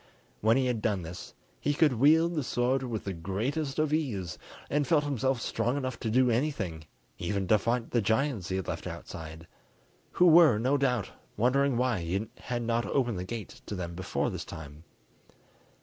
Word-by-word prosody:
When 110 +3 +4
he 135 - +2
had 120 -3 -1
done 100 -4 0
this, 85 +2 -9 0.2
he 145 - 0
could 150 -2 +4
wield 160 +5 +5
the 150 -4 -1
sword 125 +2 +1
with 120 -5 -4
the 100 - -3
greatest 115 - -2
of 155 -1 +1
ease, 100 - -2 0.3
and 145 -1 0
felt 150 0 +3
himself 135 -2 0
strong 120 +3 -1
enough 130 -2 -3
to 115 - -2
do 125 +2 +4
anything, 110 - -1 0.3
even 95 +2 -2
to 110 - +5
fight 115 +2 -1
the 120 - +2
giants 110 -2 0
he 95 - -1
had 95 -2 -3
left - - -4
outside, 80 0 -8 0.7
who 180 - +4
were 165 -8 +7
no 130 +6 +2
doubt 125 -7 0 0.3
wondering 130 +3 +2
why 125 -4 +1
he 95 +6 -2
had 120 -1 -3
not 115 0 0
opened 120 -8 0
the - - -3
gate 110 +2 -7
to 105 - -4
them 85 -2 -4
before 95 +2 -2
this - - -5
time. 75 +1 -10
120 Hz, 185 wpm, -29 LUFS, 95-135 Hz, 0.7 s, were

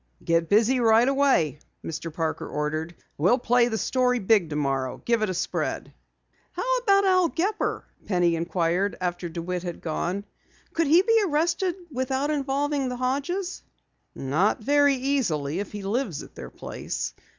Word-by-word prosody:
"Get 165 -1 +1
busy 230 +5 +4
right 230 +1 +5
away," 270 - +2 0.3
Mr. 165 +1 -5
Parker 160 0 -3
ordered. 155 +3 -3 0.2
"We'll 185 +11 +4
play 245 -1 +3
the 220 -2 -2
story 250 +1 +1
big 200 -5 +3
tomorrow 135 -4 -1
give 235 -2 +2
it 215 - +1
a - - -1
spread." 175 - -3 0.6
"How - - 0
about 400 -4 +3
Al 370 -2 +4
Gepper?" 370 +7 -1 0.2
Penny 175 -4 +2
inquired 175 +3 0
after 175 -1 -3
DeWitt 175 +2 -4
had 175 -1 -6
gone. 175 +5 -3 0.5
"Could 330 -2 +1
he 335 +6 +6
be 455 +1 +4
arrested 335 +3 +1 0.2
without 265 +2 -1
involving 280 -1 0
the 250 - -4
Hodges?" 285 +9 -2 0.5
"Not 155 +10 +1
very 285 +2 +4
easily 205 - -1
if 205 - -5
he 205 -1 -6
lives 200 - -2
at - - -14
their - - -8
place. - - -5
225 Hz, 150 wpm, -25 LUFS, 170-280 Hz, 0.6 s, he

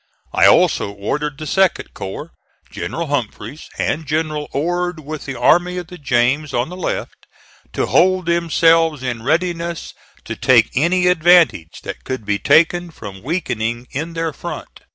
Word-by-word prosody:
I - - +5
also - - +4
ordered 135 +9 -3
the 155 - -7
2d 190 +5 +1
corps, 95 0 -7 0.4
General 170 - -4
Humphreys, 135 -1 -4
and 155 0 -2
General 155 -1 -1
Ord 175 +3 -1
with 155 +1 -7
the 135 -2 -6
Army 175 +2 +3
of 180 - -4
the 180 - -10
James, 135 +2 +1
on 120 +5 0
the 180 - -7
left, 185 - -5 0.5
to - - 0
hold 185 0 +3
themselves 165 -3 +3
in 120 -3 -3
readiness 170 +4 -1 0.3
to - - -5
take 120 -3 +4
any 175 +7 +2
advantage 175 - +3
that - - -7
could 130 -5 -5
be 105 0 0
taken 170 - +3
from 100 - -10
weakening 120 -6 -2
in 160 +5 -4
their 165 -1 -2
front. 165 +1 -8
155 Hz, 155 wpm, -19 LUFS, 130-170 Hz, 0.5 s, I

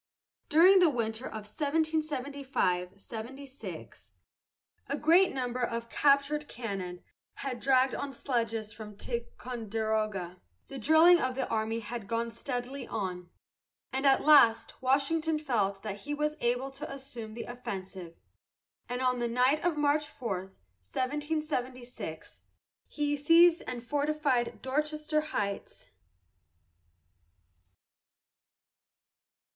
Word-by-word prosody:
During 365 +5 +7
the 355 -3 +6
winter 230 -2 -2
of 215 -1 -7
1775 280 - -1
76, 260 +6 -9 0.8
a 280 - -1
great 340 +5 +5
number 250 -1 -2
of 235 -1 -2
captured 290 +1 +3
cannon 195 -7 -5 0.3
had 275 - -4
been 245 - -6
dragged 260 0 +3
on 280 - -3
sledges 230 -4 -2
from 210 -2 -10
Ticonderoga, 220 -6 -3 0.3
the 270 - -6
drilling 320 +7 +6
of 255 0 -1
the 265 - -1
army 225 +1 -1
had 225 -1 -6
gone 230 +1 -1
steadily 250 +2 -5
on, 180 -4 -4 0.6
and 270 +2 +1
at 270 - +4
last 230 -7 +5
Washington 305 +5 +2
felt 210 -10 -1
that 205 -2 -5
he 295 +5 -4
was 300 +1 -1
able 245 +3 0
to 275 +2 -7
assume 245 -5 -8
the 235 - -5
offensive, 190 -7 -7 0.7
and 250 +1 -2
on 250 -1 +2
the 240 - 0
night 250 +5 +2
of 345 -3 +1
March 295 +1 +2
4, 195 -10 -4 0.4
1776, 260 -3 -3 0.5
he 290 -1 -1
seized 330 +4 +6
and 245 -2 -5
fortified 285 -2 0
Dorchester 305 +3 0
Heights. 205 - -4
255 Hz, 110 wpm, -30 LUFS, 225-295 Hz, 0.8 s, During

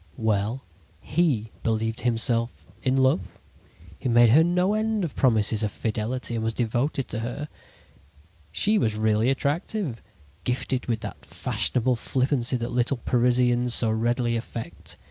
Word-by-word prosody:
"Well, 110 +2 0 0.4
he 135 -11 0
believed 110 0 -1
himself 115 0 0 0.2
in 130 +1 +1
love; 95 -10 +1 0.6
he 130 - -2
made 120 0 +6
her 155 +6 +7
no 180 +3 +2
end 215 -1 0
of 165 - -4
promises 110 -4 +2
of 105 -2 -1
fidelity, 115 +4 -3
and 115 -1 -2
was 115 0 -1
devoted 125 +4 -1
to 110 - -3
her. 125 +6 -4 1.0
"She 210 - +3
was 110 - +1
really 110 +2 +2
attractive, 145 - -2 0.4
gifted 125 0 -1
with 115 -3 -1
that - - -7
fashionable 125 0 0
flippancy 130 0 0
that 120 -1 -4
little 125 +2 +1
Parisians 125 0 +2
so 115 -2 +3
readily 120 +2 0
affect. 115 -6 -7
120 Hz, 140 wpm, -25 LUFS, 115-135 Hz, 1.0 s, her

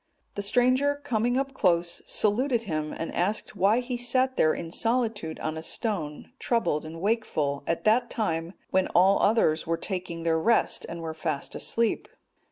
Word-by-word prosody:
The 205 - -3
stranger 255 +7 +3
coming 245 -4 -1 0.2
close 175 -6 +1
up, - - -28
saluted 235 +3 +1
him, 155 -6 -3
and 165 - -5
asked 205 +5 -1
why 205 +5 +3
he 250 0 -4
sat 255 +2 +1
there 155 - +4
in 165 0 -5
solitude 225 -7 0
on 155 0 -3
a - - -4
stone 160 -4 -3
troubled 225 -11 0
and 165 +1 -8
wakeful 165 -9 -1
at 165 - -1
that 235 +3 +3
time, 165 -5 -2 0.2
when 190 -1 +2
all 190 +3 +5
others 165 -8 +2
were 165 0 0
taking 180 -4 -4
their 165 -1 +2
rest, 230 +8 +2
and 170 0 -6
were 160 -1 -4
fast 155 -3 -3
asleep. 230 -1 -1
200 Hz, 170 wpm, -27 LUFS, 165-235 Hz, 0.2 s, all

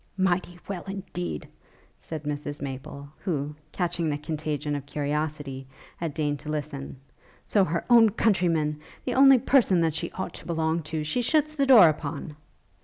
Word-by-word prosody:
'Mighty 180 -2 0
well, 195 -3 -4
indeed!' 90 - -5 0.5
said 155 -2 -7
Mrs 145 0 -4
Maple, 140 +1 -7
who, 150 -6 -2 0.2
catching 170 -2 -1
the 145 - -1
contagion 150 -1 -3
of 140 -1 -6
curiosity, 145 -2 -3 0.3
had 165 -3 -4
deigned 145 -2 -1
to 150 +2 -8
listen; 145 -3 -4 0.5
'so 205 - +3
her 170 -1 -1
own 235 -2 +7
countryman, 170 -8 +1 0.3
the 250 - -1
only 270 +1 +7
person 245 -7 +4
that 165 -2 +2
she - - -3
ought 190 - -4
to - - -10
belong 165 0 0
to, 155 0 -4
she 155 +11 0
shuts 305 +4 +1
the 280 -2 +1
door 230 -10 +9
upon!' 150 -1 -3
160 Hz, 160 wpm, -26 LUFS, 145-190 Hz, 0.5 s, door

